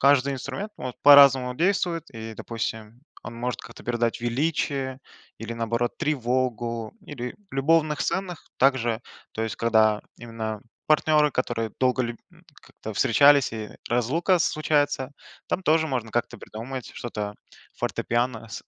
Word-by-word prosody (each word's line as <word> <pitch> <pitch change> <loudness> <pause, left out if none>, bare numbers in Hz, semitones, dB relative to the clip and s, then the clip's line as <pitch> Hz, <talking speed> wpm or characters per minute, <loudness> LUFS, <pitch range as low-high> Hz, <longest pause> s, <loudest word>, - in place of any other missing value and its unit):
каждый 140 0 +4
инструмент, 195 - -5
ну, - - -7
вот 125 - -5
по-разному 135 -3 +8
действует, 175 0 +1
и 115 -2 -7
допустим, 110 +1 -5 0.2
он 115 +2 -8
может 125 +1 -3
как-то - - -13
передать 120 -1 -1
величие, 135 +1 -1 0.4
или 115 +1 -6
наоборот 115 +1 -2
тревогу, 120 -6 -1
или 125 -4 -6 0.2
в - - -37
любовных 150 +2 +2
сценах 190 -3 -3
также, 120 -4 +2 0.3
то 110 - -3
есть 110 - -3
когда 110 -2 +3 0.2
именно 115 -2 -5 0.3
партнеры, 150 -1 +4
которые 115 -4 -2
долго 130 0 +2
лю 120 -1 -4 0.5
как-то - - -9
встречались 140 +3 +5
и 110 -2 -5 0.2
разлука 150 - +2
случается, 145 -4 +1 0.4
там 190 - -2
тоже 160 -1 +3
можно 125 -6 -3
как-то 120 0 -2
придумать 120 +5 -7
что-то 105 -3 -5 0.4
фортепиано 120 -1 -1
с 100 - -7
125 Hz, 135 wpm, -25 LUFS, 115-145 Hz, 0.5 s, по-разному